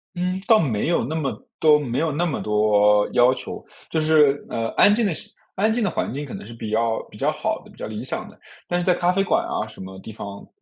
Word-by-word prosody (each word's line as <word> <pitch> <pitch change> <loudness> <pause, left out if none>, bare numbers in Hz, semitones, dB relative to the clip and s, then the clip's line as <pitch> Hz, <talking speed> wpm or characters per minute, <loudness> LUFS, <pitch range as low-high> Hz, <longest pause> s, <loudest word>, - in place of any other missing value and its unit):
嗯， 180 +1 -1
倒 225 -2 +6
没 120 -5 0
有 175 - +2
那 160 - -3
么 150 -4 -1 0.3
多 150 -2 +6
没 130 -3 -2
有 160 -1 +1
那 165 +5 0
么 155 -5 -2
多 105 -1 +3
要 125 +1 +5
求。 - - -7 0.3
就 160 - 0
是， 150 -2 +4
呃， 115 0 -2
安 205 - +5
静 225 0 +2
的 195 - +1 0.4
安 215 +3 +2
静 240 - 0
的 200 - +2
环 160 - -2
境 145 +2 -4
可 140 - -9
能 - - -7
是 115 - -9
比 110 -2 -6
较 115 +1 +1
比 - - -12
较 - - +1
好 - - -2
的， - - -16
比 - - -20
较 - - -5
理 - - -6
想 - - -4
的。 - - -19 0.3
但 175 - 0
是 175 - -2
在 180 - +4
咖 175 +1 +2
啡 195 +1 +2
馆 - - +1
啊 110 - -2
什 110 - -13
么 95 0 -9
地 110 - -9
方， 100 -1 -8
145 Hz, 285 characters per minute, -23 LUFS, 110-175 Hz, 0.4 s, 倒